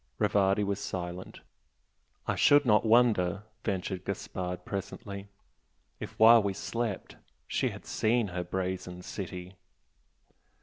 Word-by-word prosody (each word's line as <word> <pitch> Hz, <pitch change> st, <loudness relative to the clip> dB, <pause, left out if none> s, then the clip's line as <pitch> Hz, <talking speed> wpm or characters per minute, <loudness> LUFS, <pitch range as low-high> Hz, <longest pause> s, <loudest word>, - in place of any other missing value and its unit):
Rivardi 100 Hz, +1 st, +2 dB
was 100 Hz, 0 st, -1 dB
silent. 90 Hz, -2 st, -6 dB, 0.8 s
"I -, -, 0 dB
should 145 Hz, 0 st, +5 dB
not 105 Hz, -3 st, +4 dB
wonder," 105 Hz, -5 st, +3 dB, 0.2 s
ventured 95 Hz, -1 st, -2 dB
Gaspard, 90 Hz, -2 st, -4 dB
presently 100 Hz, 0 st, -6 dB, 0.7 s
"if -, -, -8 dB
while 115 Hz, +1 st, +8 dB
we 100 Hz, -1 st, -1 dB
slept 115 Hz, 0 st, -4 dB, 0.3 s
she -, -, 0 dB
had -, -, -10 dB
seen 110 Hz, -1 st, +1 dB
her 90 Hz, 0 st, -3 dB
'Brazen 90 Hz, 0 st, -4 dB
City'!" 90 Hz, -1 st, -7 dB
100 Hz, 115 wpm, -30 LUFS, 90-105 Hz, 0.8 s, while